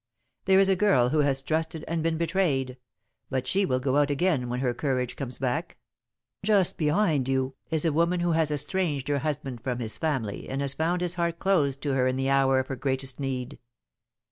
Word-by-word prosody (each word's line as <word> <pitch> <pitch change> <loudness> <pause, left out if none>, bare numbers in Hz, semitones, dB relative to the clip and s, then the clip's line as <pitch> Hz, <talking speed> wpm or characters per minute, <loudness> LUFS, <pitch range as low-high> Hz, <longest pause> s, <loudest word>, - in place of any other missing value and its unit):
There 190 0 +5
is 195 - +5
a 195 - +3
girl 135 -12 +3
who 155 - +1
has 135 -2 +2
trusted 160 +1 -2
and 165 0 -1
been 165 0 0
betrayed, 160 -7 0 0.5
but 130 -1 -2
she 195 0 +1
will 130 -4 +1
go 130 +1 0
out 145 0 +3
again 145 -4 +1
when 125 +1 -2
her 125 -2 0
courage 125 -2 -2
comes 130 -3 -5
back. 130 -2 -2 0.7
Just 200 -3 +3
behind 155 -4 +1
you 130 0 0 0.2
is 160 0 0
a 160 - +2
woman 170 +3 +2
who 175 0 +1
has 160 -1 +2
estranged 150 -2 -1
her 145 -1 +1
husband 135 -4 -4
from 125 -1 -2
his 110 -3 -4
family 130 -10 -2
and 135 - -3
has 140 -1 +1
found 170 +4 0
his 175 -1 +1
heart 170 0 0
closed 145 -9 +1
to 145 -2 0
her 130 -1 +2
in 130 - 0
the 135 +1 0
hour 135 -1 +3
of 130 - +1
her 135 - -2
greatest 130 0 -2
need. 135 0 -4
140 Hz, 210 wpm, -27 LUFS, 130-165 Hz, 0.7 s, There